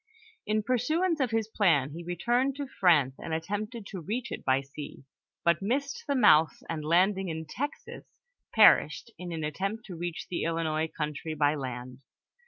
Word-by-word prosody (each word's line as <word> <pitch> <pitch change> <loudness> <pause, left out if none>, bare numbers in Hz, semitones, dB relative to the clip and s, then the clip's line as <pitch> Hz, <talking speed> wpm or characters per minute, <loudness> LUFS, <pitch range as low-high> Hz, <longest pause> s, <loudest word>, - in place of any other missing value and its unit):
In 215 0 +1
pursuance 310 - +1
of 260 -3 +1
his 225 -1 0
plan 165 -11 +2
he 170 +3 -7
returned 240 +10 0
to 285 0 -4
France, 165 - +3
and 160 - -3
attempted 210 +7 -4
to 190 -3 -7
reach 230 +7 -4
it - - -5
by 130 0 +2
sea, 140 0 -9 0.4
but 170 0 +3
missed 280 - -2
the 280 - +1
mouth, 160 - +5
and 160 -2 -4
landing 185 +4 +2
in 160 0 -4
Texas, 285 - -6 0.4
perished 235 - +5
in 180 -1 -6
an 160 -2 -4
attempt 195 +9 -3
to 185 - -8
reach 175 0 -4
the 175 - -3
Illinois 160 -1 0
country 155 0 -4
by 145 -1 +3
land. 125 -3 -6
175 Hz, 170 wpm, -29 LUFS, 155-225 Hz, 0.4 s, mouth